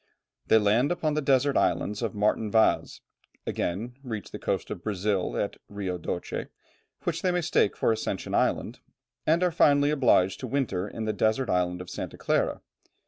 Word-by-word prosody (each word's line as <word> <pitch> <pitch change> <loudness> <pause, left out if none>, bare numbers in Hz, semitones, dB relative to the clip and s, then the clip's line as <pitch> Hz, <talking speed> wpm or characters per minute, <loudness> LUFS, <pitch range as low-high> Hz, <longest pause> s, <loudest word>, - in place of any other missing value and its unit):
They 110 - +6
land 110 +7 +3
upon 155 -3 0
the 150 - 0
desert 140 0 +2
islands 105 +2 +1
of 115 -4 -2
Martin 105 +1 +1
Vaz, 110 +1 +2 0.4
again 110 +8 -2
reach 115 -6 -6
the - - -7
coast - - -2
of - - -5
Brazil 100 -2 -1
at - - -2
Rio 95 -3 -4
Doce, 85 +1 -4 0.6
which - - -2
they 185 - +1
mistake 175 - +1
for - - +2
Ascension 110 -3 -3
Island, 120 - 0 0.5
and 165 +3 +3
are 180 - +3
finally 145 -2 +4
obliged 115 -10 +3
to 130 - -5
winter 110 -8 -1
in 110 +1 -5
the 110 - 0
desert 110 +5 +1
island 90 0 0
of 90 - -9
Santa - - -6
Clara. - - 0
110 Hz, 170 wpm, -27 LUFS, 100-140 Hz, 0.6 s, They